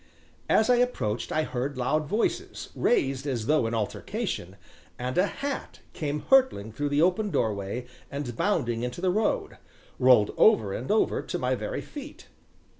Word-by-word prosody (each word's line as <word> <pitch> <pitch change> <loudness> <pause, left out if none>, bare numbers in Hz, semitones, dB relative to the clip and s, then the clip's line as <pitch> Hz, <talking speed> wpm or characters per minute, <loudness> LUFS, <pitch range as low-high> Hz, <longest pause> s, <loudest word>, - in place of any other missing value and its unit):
As 220 - +4
I 250 -1 +5
approached 240 - -1
I 155 - +1
heard 135 0 -3
loud 150 +4 0
voices, 210 +8 -2
raised 135 - +1
as 120 -5 -2
though 150 -3 +2
in 115 - -2
altercation, 100 -3 -3 0.4
and 125 +1 -3
a 185 +3 +3
hat 280 +4 -5
came 150 -1 -3
hurtling 260 - +4
through 145 +6 -2
the 145 +2 +3
open 205 +4 +2
doorway 105 - -1 0.2
and, 140 -4 -5
bounding 120 - 0
into 125 +5 -4
the 185 0 +1
road, 215 +3 -1 0.4
rolled 125 -5 +5
over 110 - +5
and 125 - -5
over 215 - +2
to - - -4
my - - 0
very - - -3
feet. 290 0 -10
145 Hz, 160 wpm, -27 LUFS, -, 0.4 s, I